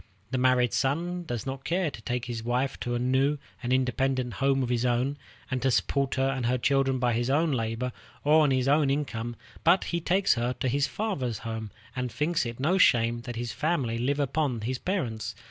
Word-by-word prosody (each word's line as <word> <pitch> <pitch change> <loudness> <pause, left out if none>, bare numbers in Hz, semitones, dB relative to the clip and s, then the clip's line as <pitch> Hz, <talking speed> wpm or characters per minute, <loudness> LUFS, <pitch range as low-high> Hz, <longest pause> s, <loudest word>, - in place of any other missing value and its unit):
The 130 - 0
married 125 -3 +3
son 175 +6 -1
does 120 -6 -4
not 135 0 -5
care 175 -2 0
to 115 - -10
take 120 +2 -2
his 115 -2 -5
wife 125 +3 -1
to 120 0 -2
a - - +1
new 130 +4 +2 0.2
and 125 -1 -3
independent 130 -1 +1
home 135 +5 +1
of 120 - -2
his 120 -1 +1
own, 125 +3 +1 0.4
and 130 -1 -1
to 135 - +2
support 135 +2 +1
her 135 0 +2
and 135 -3 -1
her 125 +1 +2
children 135 +1 +2
by 125 -1 +1
his 120 +2 0
own 155 +3 +2
labor 115 0 -1 0.3
or 155 +2 +5
on 150 - +4
his 130 -1 +1
own 145 0 +4
income, 120 -5 -2 0.3
but 175 +3 +5
he 170 -1 -2
takes 190 +4 +3
her 120 +1 -1
to 130 - -3
his 140 +3 +1
father's 140 - -2
house, 110 -1 -4 0.3
and 125 -1 -2
thinks 150 +3 0
it 115 +1 -7
no 170 +8 +2
shame 120 -5 +4
that 120 -2 -5
his 120 0 -3
family 140 -8 0
live 140 +4 0
upon 140 -4 0
his 125 +4 -2
parents. 115 - -2
130 Hz, 215 wpm, -28 LUFS, 120-145 Hz, 0.4 s, or